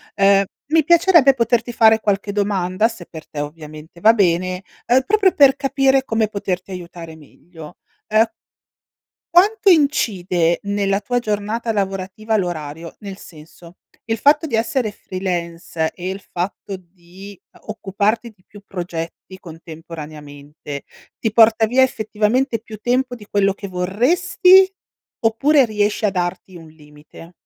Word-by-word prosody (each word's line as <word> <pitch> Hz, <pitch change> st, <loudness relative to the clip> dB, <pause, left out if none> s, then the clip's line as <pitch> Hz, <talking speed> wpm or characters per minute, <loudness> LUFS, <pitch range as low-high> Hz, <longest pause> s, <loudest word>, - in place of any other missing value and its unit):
ehm, 195 Hz, 0 st, +4 dB, 0.3 s
mi 320 Hz, -2 st, +3 dB
piacerebbe 335 Hz, -4 st, +5 dB
poterti 240 Hz, -1 st, 0 dB
fare 220 Hz, -1 st, +5 dB
qualche 200 Hz, -1 st, -1 dB
domanda, 200 Hz, 0 st, 0 dB
se 225 Hz, -7 st, -10 dB
per 160 Hz, -2 st, -12 dB
te 145 Hz, -, -5 dB
ovviamente 155 Hz, +2 st, -10 dB
va 220 Hz, +5 st, +6 dB
bene, 185 Hz, -2 st, 0 dB, 0.2 s
uhm, 255 Hz, +2 st, +4 dB
proprio 400 Hz, -2 st, +3 dB
per 275 Hz, -2 st, +5 dB
capire 270 Hz, -1 st, +1 dB
come 225 Hz, -2 st, 0 dB
poterti 195 Hz, -3 st, -4 dB
aiutare 170 Hz, -3 st, -9 dB
meglio. 160 Hz, +2 st, -14 dB, 0.4 s
Uhm 220 Hz, +1 st, +5 dB, 1.1 s
quanto 400 Hz, +4 st, +3 dB
incide 190 Hz, -, +2 dB
nella 200 Hz, -1 st, -1 dB
tua 245 Hz, +4 st, -1 dB
giornata 215 Hz, +1 st, -3 dB
lavorativa 200 Hz, +2 st, -2 dB
l'orario, 165 Hz, -4 st, -5 dB
nel 200 Hz, -2 st, -8 dB
senso, 165 Hz, +2 st, -15 dB, 0.3 s
il 225 Hz, -1 st, -2 dB
fatto 295 Hz, +6 st, +3 dB
di 235 Hz, -7 st, -1 dB
essere 225 Hz, 0 st, -1 dB
freelance, 170 Hz, -4 st, -4 dB
e 180 Hz, 0 st, -6 dB
il 195 Hz, +1 st, -5 dB
fatto 190 Hz, +2 st, -5 dB
di, 185 Hz, +2 st, -15 dB
uhm, -, -, -21 dB
occuparti 215 Hz, +2 st, -2 dB
di 205 Hz, -4 st, -28 dB
più 205 Hz, 0 st, -15 dB
progetti 175 Hz, 0 st, -7 dB
contemporaneamente, 155 Hz, -4 st, -10 dB, 0.3 s
ti 220 Hz, -, -1 dB
porta 225 Hz, 0 st, +5 dB
via 250 Hz, +4 st, +3 dB
effettivamente 230 Hz, +1 st, 0 dB
più 220 Hz, -1 st, -11 dB
tempo 250 Hz, +3 st, -1 dB
di 210 Hz, -4 st, -13 dB
quello 200 Hz, -1 st, +2 dB
che 200 Hz, 0 st, -9 dB
vorresti, 345 Hz, -, +3 dB, 0.5 s
oppure 265 Hz, +5 st, +3 dB
riesci 210 Hz, 0 st, -1 dB
a -, -, +1 dB
darti 180 Hz, 0 st, -4 dB
un 165 Hz, -2 st, -12 dB
limite? 150 Hz, +2 st, -16 dB
200 Hz, 135 wpm, -19 LUFS, 175-230 Hz, 1.1 s, va